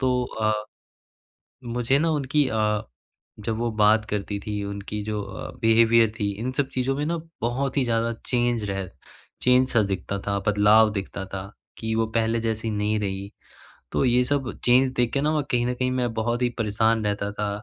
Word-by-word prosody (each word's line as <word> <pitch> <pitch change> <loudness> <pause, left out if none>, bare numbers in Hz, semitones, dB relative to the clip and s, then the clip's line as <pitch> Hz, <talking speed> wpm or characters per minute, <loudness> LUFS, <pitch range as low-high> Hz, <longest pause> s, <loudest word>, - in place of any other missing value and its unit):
तो 125 -1 +1
अ, 110 -2 -1 1.1
मुझे 120 +3 +1
ना 165 +1 +2
उनकी 145 -1 +1
अ, 105 -1 +1 0.6
जब 110 +1 -2
वो 120 0 0
बात 110 0 +4
करती 105 0 -2
थी 105 -1 -2
उनकी 100 +1 -5
जो 105 -1 -2
अ, 95 -1 -7
बिहेवियर 115 0 +5
थी 100 0 +1
इन 130 +2 -2
सब 135 0 0
चीज़ों 130 +1 0
में 145 +1 -1
ना 170 +1 -1 0.2
बहुत 130 +4 -1
ही 135 - +3
ज़्यादा 115 0 0
चेंज 120 -3 +1
रह 95 -2 -3 0.5
चेंज 125 +1 +4
सा 115 - +4
दिखता 100 0 -3
था 100 0 0
बदलाव 105 +1 +5
दिखता 100 -1 -4
था, 95 +1 -7 0.3
कि 110 0 -2
वो 115 0 +2
पहले 115 0 +1
जैसी 110 0 -2
नहीं 105 +1 0
रही। 100 0 -3 0.6
तो - - +1
ये 125 0 +4
सब 135 -2 0
चेंज 130 +2 +5
देख 120 -2 +1
के 140 - +2
ना 150 +1 +1
कहीं 120 -1 +2
न 125 - 0
कहीं 130 +1 -1
मैं 125 -2 0
बहुत 120 +2 -1
ही 120 - +3
परेशान 110 0 +1
रहता 100 0 -1
था 105 0 -2
115 Hz, 185 wpm, -25 LUFS, 105-125 Hz, 1.1 s, बिहेवियर